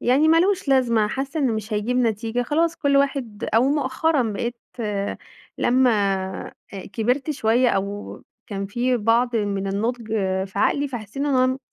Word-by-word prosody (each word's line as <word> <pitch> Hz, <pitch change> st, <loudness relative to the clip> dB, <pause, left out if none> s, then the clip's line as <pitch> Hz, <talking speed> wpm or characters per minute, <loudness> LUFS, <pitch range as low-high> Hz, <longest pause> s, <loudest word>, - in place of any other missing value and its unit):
يعني 275 Hz, +6 st, +3 dB
ما 330 Hz, +1 st, +6 dB
لوش 375 Hz, -4 st, +1 dB
لازمة، 235 Hz, -5 st, +3 dB
حاسة 275 Hz, +6 st, -3 dB
إنه 255 Hz, -5 st, +2 dB
مش 215 Hz, 0 st, -4 dB
هيجيب 215 Hz, +4 st, 0 dB
نتيجة، 230 Hz, 0 st, 0 dB
خلاص 330 Hz, +6 st, 0 dB
كُلّ 280 Hz, -3 st, +2 dB
واحد 270 Hz, -6 st, 0 dB
أو 230 Hz, -, +5 dB
مؤخرًا 285 Hz, +1 st, +1 dB
بقيت 235 Hz, +4 st, -3 dB, 1.0 s
لمّا 255 Hz, 0 st, +3 dB, 0.6 s
آآ -, -, -17 dB, 0.4 s
كِبرت 250 Hz, +7 st, 0 dB
شوية 245 Hz, -2 st, +2 dB
أو 200 Hz, 0 st, -3 dB, 0.2 s
كان 195 Hz, -1 st, -4 dB
في 245 Hz, +4 st, 0 dB
بعض 230 Hz, +2 st, +2 dB
من 200 Hz, -2 st, -1 dB
النضج 225 Hz, +4 st, -2 dB, 0.4 s
في 190 Hz, -, -19 dB
عقلي، 285 Hz, +6 st, +2 dB
فحسيت 225 Hz, -3 st, -8 dB
إن 285 Hz, +1 st, -1 dB
أنا 260 Hz, -1 st, +2 dB
245 Hz, 155 wpm, -23 LUFS, 220-275 Hz, 1.0 s, ما